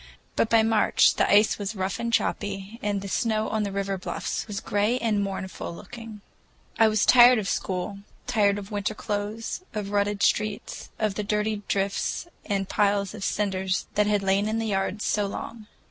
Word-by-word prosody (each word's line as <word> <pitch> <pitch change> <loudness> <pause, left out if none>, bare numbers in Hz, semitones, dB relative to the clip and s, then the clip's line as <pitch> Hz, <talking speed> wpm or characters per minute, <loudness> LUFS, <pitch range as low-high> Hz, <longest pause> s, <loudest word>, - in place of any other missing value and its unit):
But 225 - +2
by 225 -1 +5
March 220 -1 +4
the - - +1
ice 210 +1 +4
was 205 +2 -3
rough 190 0 -2
and 235 0 -2
choppy, 205 -1 -1
and 205 -1 -1
the 200 - -6
snow 220 +1 0
on 220 - 0
the 200 -1 -2
river 195 -1 -2
bluffs 185 - -4
was 205 -2 -4
gray 210 +4 +1
and 220 -4 0
mournful 190 -2 -5
looking. 225 +1 -10 0.6
I 225 - +7
was 215 -1 +2
tired 245 0 +8
of 210 -3 -2
school, 190 +1 -2 0.3
tired 205 -5 +2
of 205 0 -8
winter 205 +1 -2
clothes, 210 - -3
of 210 -1 -2
the 200 - -7
rutted 205 0 0
streets, 210 -1 -1
of 215 -2 0
the 210 - -3
dirty 210 0 -1
drifts 200 - -1 0.2
and 195 -2 -1
the - - -9
piles 200 -1 +2
of 215 -3 -7
cinders 190 -3 -1
that 210 0 +2
had 205 -1 +1
lain 195 +2 +2
in 220 - -1
the 225 - -1
yards 195 +1 -1
so 205 -1 +1
long. 215 +2 -7
205 Hz, 190 wpm, -26 LUFS, 200-220 Hz, 0.6 s, tired